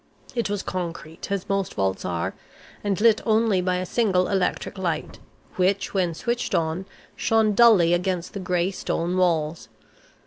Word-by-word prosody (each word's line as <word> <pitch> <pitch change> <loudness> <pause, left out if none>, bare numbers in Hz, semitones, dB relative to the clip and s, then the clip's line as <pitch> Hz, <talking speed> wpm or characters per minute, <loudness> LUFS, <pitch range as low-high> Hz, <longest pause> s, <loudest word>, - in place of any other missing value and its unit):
It 235 -4 -1
was 205 -1 -2
concrete, 170 -1 -5
as 200 -2 -2
most 195 -2 -1
vaults 95 -1 -1
are, 85 -2 -2 0.5
and 205 -2 0
lit 225 0 +4
only 220 -3 +2
by 180 0 0
a 180 0 -2
single 185 -3 +1
electric 190 0 -1
light, 170 -4 -3 0.4
which, 190 +2 +1
when 180 -4 0
switched 240 +6 -2
on, 165 +4 -1 0.3
shone 220 -1 +2
dully 200 -7 +6
against 180 0 -1
the 200 - -4
gray 180 0 0
stone 175 -2 -2
walls. 165 -3 0
185 Hz, 150 wpm, -24 LUFS, 170-205 Hz, 0.5 s, dully